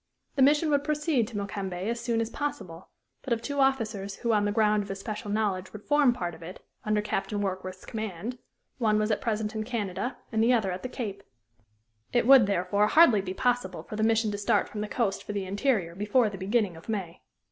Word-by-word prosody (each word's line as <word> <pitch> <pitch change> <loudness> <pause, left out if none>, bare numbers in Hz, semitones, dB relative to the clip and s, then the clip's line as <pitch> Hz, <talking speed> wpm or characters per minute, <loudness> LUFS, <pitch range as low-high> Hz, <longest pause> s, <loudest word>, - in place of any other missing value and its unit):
The 275 - +1
mission 295 +3 +4
would 285 -1 +2
proceed 300 -5 +1
to 220 - -6
Mokembe 195 -2 -4
as 235 +1 -1
soon 235 -1 0
as 230 0 -3
possible, 185 - -5 0.3
but 260 - -1
of 230 - -1
two 285 +4 -4
officers 220 -7 0
who 235 -2 0
on 205 -1 +2
the 205 - +1
ground 210 0 +3
of 200 - -8
especial 205 +2 -5
knowledge 200 -3 -1
would 210 -1 -9
form 290 -3 +4
part 175 -8 -3
of - - -13
it, 175 +3 -9 0.2
under 210 -1 +1
Captain 210 0 -2
Warkworth's 185 -1 -4
command, 220 +2 -5 0.4
one 215 -3 +3
was 215 +1 +1
at 210 - 0
present 220 -4 -1
in 215 -1 -2
Canada 225 +1 -3
and 220 0 +2
the 245 +2 +4
other 215 -6 +1
at 180 - -5
the 255 - -5
Cape. 205 -6 -5 0.9
It 240 - +3
would, 260 -4 +8
therefore, 200 +2 +2
hardly 245 -8 +6
be 190 -1 -5
possible 245 -6 0
for - - -8
the 215 - -2
mission 225 0 +2
to 205 - -4
start 205 - +2
from 210 - -6
the 210 - -2
coast 205 -3 -1
for 205 - -6
the 200 -2 -2
interior 200 -3 0
before 210 +4 +2
the 195 - -7
beginning 200 -1 0
of 165 +6 -13
May. 190 -6 -4
215 Hz, 220 wpm, -28 LUFS, 195-240 Hz, 0.9 s, would